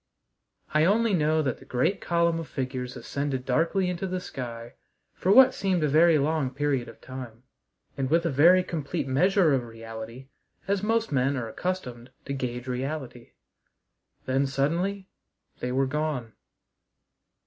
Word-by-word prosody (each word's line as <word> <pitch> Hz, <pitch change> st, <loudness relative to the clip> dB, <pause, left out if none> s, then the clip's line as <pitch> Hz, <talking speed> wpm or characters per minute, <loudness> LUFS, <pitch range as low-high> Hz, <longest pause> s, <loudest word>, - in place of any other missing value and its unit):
I 155 Hz, 0 st, +4 dB
only 215 Hz, +5 st, +3 dB
know 155 Hz, -2 st, +2 dB
that 130 Hz, -4 st, -3 dB
great 130 Hz, +11 st, 0 dB
column 170 Hz, -1 st, +1 dB
of 165 Hz, -, -6 dB
figures 130 Hz, -2 st, -4 dB
ascended 140 Hz, -2 st, -3 dB
darkly 165 Hz, +8 st, +1 dB
into 180 Hz, +1 st, -2 dB
the 185 Hz, 0 st, -2 dB
sky 120 Hz, -7 st, -7 dB, 0.4 s
for 185 Hz, -, 0 dB
what 260 Hz, +4 st, +8 dB
seemed 185 Hz, -4 st, 0 dB
a -, -, +3 dB
very 160 Hz, +3 st, +5 dB
long 150 Hz, -1 st, +1 dB
period 135 Hz, -2 st, -1 dB
of 115 Hz, -, -14 dB
time, 125 Hz, -3 st, -9 dB, 0.5 s
and 135 Hz, -1 st, -2 dB
with 165 Hz, +3 st, +2 dB
a 165 Hz, -, +1 dB
very 170 Hz, +7 st, +6 dB
complete 155 Hz, -3 st, -3 dB
measure 175 Hz, +4 st, +3 dB
of 130 Hz, -, +2 dB
reality 115 Hz, +2 st, -9 dB, 0.4 s
as 200 Hz, -1 st, +1 dB
most 225 Hz, 0 st, 0 dB
men 135 Hz, 0 st, +1 dB
are 120 Hz, -3 st, -3 dB
accustomed 125 Hz, -4 st, -4 dB, 0.2 s
to 140 Hz, -, -3 dB
gauge 125 Hz, -2 st, -4 dB
reality. 130 Hz, -1 st, -5 dB, 0.9 s
Then 135 Hz, +1 st, +1 dB
suddenly 170 Hz, +9 st, -1 dB, 0.5 s
they 125 Hz, -, -3 dB
were 135 Hz, +2 st, +2 dB
gone! 145 Hz, -5 st, -2 dB
140 Hz, 150 wpm, -27 LUFS, 125-170 Hz, 0.9 s, what